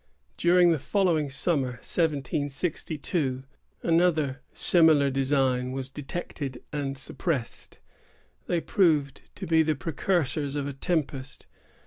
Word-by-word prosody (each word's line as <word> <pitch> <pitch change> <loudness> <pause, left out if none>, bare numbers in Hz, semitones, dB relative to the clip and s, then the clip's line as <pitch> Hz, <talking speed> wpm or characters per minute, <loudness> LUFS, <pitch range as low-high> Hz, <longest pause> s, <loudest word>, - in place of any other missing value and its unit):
During 175 0 +4
the 160 - +1
following 170 -5 +1
summer, 135 -2 0
1762, 145 0 -2 0.4
another 165 -5 +2
similar 155 -5 +5
design 130 -2 +1
was 135 0 -4
detected 140 -2 -6
and 140 -2 -3
suppressed. 135 -2 -4 0.7
They 170 -1 0
proved 155 -8 +1
to - - -6
be 160 0 +4
the 155 -1 +1
precursors 150 -2 -1
of 145 -1 -2
a 140 - -4
tempest. 135 -4 -3
145 Hz, 105 wpm, -27 LUFS, 135-165 Hz, 0.7 s, similar